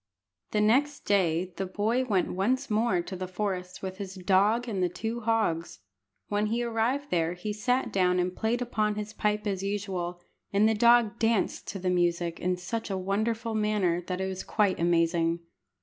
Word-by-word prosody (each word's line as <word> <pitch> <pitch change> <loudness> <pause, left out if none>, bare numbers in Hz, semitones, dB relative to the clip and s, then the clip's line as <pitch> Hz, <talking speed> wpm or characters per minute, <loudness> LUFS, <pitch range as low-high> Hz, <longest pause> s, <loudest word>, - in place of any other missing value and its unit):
The 210 - +1
next 275 +7 +2
day 180 -2 +1
the 190 - -2
boy 220 +7 0
went 200 -7 0
once 250 +8 0
more 210 -5 +2
to 190 - -6
the 185 0 -4
forest 185 -1 -4
with 190 0 -5
his 195 -1 -6
dog 200 +6 +2
and 200 -5 -2
the 180 - +2
two 225 +6 -4
hogs. 220 -8 0 0.5
When 205 +1 0
he 235 +3 0
arrived 240 +5 -1
there 170 -1 +1
he 195 +4 -4
sat 250 +5 0
down 180 -1 +3
and 180 0 0
played 235 +2 0
upon 215 -3 0
his 210 0 -5
pipe 210 -1 0
as 195 -2 -1
usual, 190 -3 -3 0.3
and 205 +2 +4
the 220 - +3
dog 235 0 +4
danced 225 -2 +1
to - - -4
the 185 -1 -1
music 175 -1 0
in 180 0 0
such 220 +6 -4
a 195 - -1
wonderful 220 +4 -1
manner 210 -5 +1
that 180 0 -2
it 190 - -1
was 190 -1 -4
quite 205 -4 +1
amazing. 170 0 +2
200 Hz, 185 wpm, -28 LUFS, 180-225 Hz, 0.5 s, and